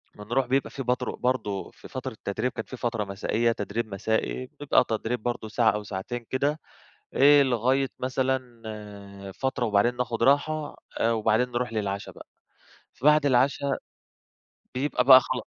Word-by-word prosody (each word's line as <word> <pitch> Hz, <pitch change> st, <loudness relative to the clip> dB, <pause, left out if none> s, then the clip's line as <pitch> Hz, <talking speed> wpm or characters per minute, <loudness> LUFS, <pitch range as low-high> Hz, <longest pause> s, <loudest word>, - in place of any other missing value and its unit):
بنروح 120 Hz, +6 st, -1 dB
بيبقى 135 Hz, +2 st, +1 dB
في 135 Hz, -, -6 dB
برضه- 125 Hz, 0 st, -1 dB
برضه، 125 Hz, -6 st, -2 dB
في -, -, -14 dB
فترة -, -, -5 dB
التدريب 110 Hz, +5 st, -3 dB
كانت 110 Hz, -, -7 dB
في 130 Hz, -, -7 dB
فترة 115 Hz, -3 st, -1 dB
مسائية 110 Hz, +4 st, 0 dB
تدريب 110 Hz, +1 st, -3 dB
مسائي، 110 Hz, +5 st, -1 dB
بتبقى 145 Hz, -1 st, +1 dB
تدريب 115 Hz, +1 st, -2 dB
برضه 120 Hz, -2 st, -2 dB
ساعة 110 Hz, +1 st, +3 dB
أو 105 Hz, 0 st, -4 dB
ساعتين 105 Hz, +4 st, -5 dB
كده، 145 Hz, +4 st, 0 dB, 0.5 s
إيه 145 Hz, +1 st, +7 dB
لغاية 130 Hz, +2 st, +1 dB
مثلًا 130 Hz, -2 st, -2 dB
آآ 100 Hz, -2 st, -9 dB
فترة 130 Hz, +1 st, -2 dB
وبعدين 110 Hz, +3 st, +2 dB
ناخد 115 Hz, -2 st, -1 dB
راحة، 145 Hz, +2 st, +2 dB, 0.2 s
آآ 115 Hz, -, +2 dB
وبعدين 115 Hz, +2 st, +2 dB
نروح 120 Hz, -1 st, -2 dB
للعشا 100 Hz, -2 st, -3 dB
بقى، -, -, -14 dB, 0.7 s
فبعد 150 Hz, +2 st, +4 dB
العشا 135 Hz, +1 st, +2 dB, 1.0 s
بيبقى 130 Hz, -1 st, 0 dB
بقى 130 Hz, 0 st, +10 dB
خلا -, -, -4 dB
120 Hz, 150 wpm, -26 LUFS, 110-130 Hz, 1.0 s, بقى